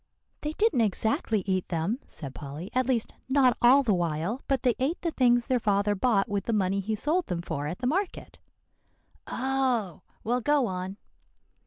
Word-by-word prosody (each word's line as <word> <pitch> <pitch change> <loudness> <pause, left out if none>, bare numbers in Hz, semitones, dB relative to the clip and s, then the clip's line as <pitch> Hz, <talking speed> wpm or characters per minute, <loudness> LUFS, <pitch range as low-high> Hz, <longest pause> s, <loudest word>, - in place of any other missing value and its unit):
"They 300 +1 -3
didn't 370 - +2
exactly 220 0 0
eat 185 -2 0
them," 175 +9 -1
said 140 -4 -8
Polly, 150 +7 -8
"at 255 0 +1
least 240 -4 0 0.2
not 265 -3 +4
all 260 +4 +6
the 220 -5 +2
while; 175 - -1
but 270 -3 0
they 250 -2 +4
ate 280 +7 0
the 335 - 0
things 245 -4 +3
their 255 -1 +1
father 205 -1 +1
bought 205 0 +2
with 200 -3 -2
the 230 - -1
money 195 -1 +1
he 215 +3 -2
sold 315 - 0
them 170 -1 -3
for 145 -3 -3
at 170 +4 -4
the 250 - -5
market." 360 +8 -2 0.9
"Oh! 255 - -1 0.2
well, 245 +3 0
go 290 +1 +3
on." 185 0 -4
225 Hz, 180 wpm, -27 LUFS, 190-260 Hz, 0.9 s, all